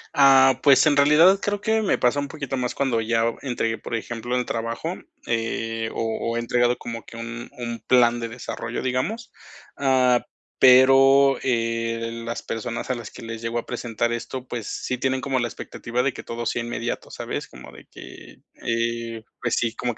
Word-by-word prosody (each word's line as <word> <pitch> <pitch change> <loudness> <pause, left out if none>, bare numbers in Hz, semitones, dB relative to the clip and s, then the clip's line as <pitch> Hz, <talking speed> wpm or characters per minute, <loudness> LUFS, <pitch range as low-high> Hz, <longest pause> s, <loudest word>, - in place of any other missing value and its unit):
Ah, 135 -2 +6
pues, 140 +1 +6
en 145 -2 +4
realidad, 160 +7 +6
creo 205 0 -1
que 220 +1 +1
me 205 - +1
pasa 125 +4 +2
un 140 - -2
poquito 140 -3 -5
más 125 -1 -2
cuando 125 -5 +1
ya 115 +1 +1
o - - -8
entregué, 115 -4 -2
por 115 - -4
ejemplo, 120 +2 -4
el 125 - -1
trabajo. 115 +10 -3 0.3
Eh, 115 -1 -2
o - - -3 0.3
o - - -2
he - - +1
entregado 120 +1 +1
como 115 -1 -7
que 115 - -12
un 120 +1 -7
un 120 -1 -5
plan 120 +1 +3
de 115 - -3
desarrollo, 120 -1 -5
digamos. 205 - -2 0.4
Ah, 130 -3 +3 0.4
pero 135 +1 +7
eh, 115 -1 -1
las 115 0 -4
personas 115 +3 -5
a 130 - +1
las 120 -3 -8
que - - -11
les 115 -1 -7
llego 115 +1 -2
a - - -7
presentar 120 0 -2
esto, 125 +2 -5
pues, 115 -4 -5
sí 125 - -3
tienen 130 +1 0
como 135 -1 -1
la 120 - 0
expectativa 120 +1 -4
de 135 -1 0
que - - -9
todo 115 0 -5
sea 120 - -1
inmediato, 120 0 -4
¿sabes? - - -5
Como 65 - -12
de - - -14
que, - - -12 0.3
eh, 115 -1 -2 0.2
pues 120 - 0
sí, 115 -1 -1
como 120 -1 -2
que - - -18
120 Hz, 195 wpm, -23 LUFS, 115-130 Hz, 0.4 s, pero